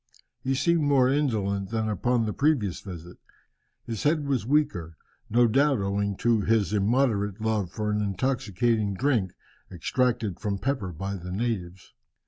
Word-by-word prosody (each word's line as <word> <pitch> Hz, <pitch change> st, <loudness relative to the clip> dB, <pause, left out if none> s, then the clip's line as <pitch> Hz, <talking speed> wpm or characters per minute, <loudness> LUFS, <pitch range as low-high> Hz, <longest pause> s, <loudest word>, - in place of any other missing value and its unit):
He 135 Hz, +1 st, 0 dB
seemed 170 Hz, +4 st, +2 dB
more 140 Hz, -3 st, +4 dB
indolent 100 Hz, -9 st, 0 dB
than 110 Hz, -1 st, -1 dB
upon 115 Hz, +3 st, +1 dB
the 105 Hz, -, -2 dB
previous 135 Hz, -, +1 dB
visit. 90 Hz, -3 st, -9 dB, 0.7 s
His 115 Hz, -3 st, -4 dB
head 150 Hz, 0 st, +1 dB
was 130 Hz, -6 st, -1 dB
weaker, 140 Hz, -, 0 dB, 0.3 s
no 120 Hz, +2 st, +4 dB
doubt 135 Hz, +4 st, +3 dB
owing 100 Hz, 0 st, -1 dB
to 115 Hz, -2 st, +4 dB
his 105 Hz, -2 st, +1 dB
immoderate 105 Hz, -1 st, +1 dB
love 110 Hz, -4 st, 0 dB
for 105 Hz, +1 st, -2 dB
an 105 Hz, 0 st, 0 dB
intoxicating 105 Hz, -1 st, 0 dB
drink 110 Hz, -6 st, +1 dB, 0.4 s
extracted 115 Hz, +2 st, -1 dB
from 100 Hz, -3 st, -2 dB
pepper 125 Hz, -5 st, -2 dB
by 95 Hz, +4 st, -4 dB
the 90 Hz, 0 st, -8 dB
natives. 95 Hz, -4 st, -3 dB
110 Hz, 145 wpm, -26 LUFS, 100-130 Hz, 0.7 s, more